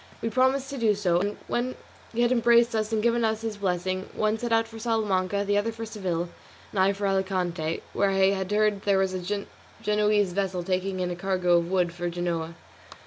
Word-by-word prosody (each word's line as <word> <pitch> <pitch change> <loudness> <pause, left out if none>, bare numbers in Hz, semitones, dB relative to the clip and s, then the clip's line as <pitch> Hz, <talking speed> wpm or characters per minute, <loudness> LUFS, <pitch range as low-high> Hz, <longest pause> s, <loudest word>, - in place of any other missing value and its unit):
We 230 - -2
promised 260 +2 +2
to 275 - -5
do 220 -3 +3
so, 180 -4 +2
and 205 +3 -2
when 250 +1 -1 0.4
he 235 - -1
had 240 - +2
embraced 235 -1 +4
us 215 0 -1
and 215 -1 0
given 235 0 +2
us 220 0 0
his 225 -2 -4
blessing, 185 -1 -2
one 215 0 +1
set 240 0 -3
out 225 0 +3
for 225 0 -10
Salamanca, 205 -4 0
the 205 0 +2
other 225 +2 -1
for 225 0 -6
Seville, 185 -6 -2 0.4
and 200 - -2
I 190 +1 +5
for 200 +1 -3
Alicante, 180 -4 -1
where 200 - +2
I 195 0 +4
had 190 -1 -2
heard 210 -1 +2
there 200 -1 +2
was 190 -1 +1
a 195 +2 -3 0.4
Genoese 210 -2 +2
vessel 190 -2 -1
taking 185 +1 -1
in 180 0 -1
a - - -3
cargo 180 -1 +2
of 170 0 -1
wool 180 -2 +2
for 175 +1 -4
Genoa. 170 -1 -3
200 Hz, 210 wpm, -26 LUFS, 185-220 Hz, 0.4 s, I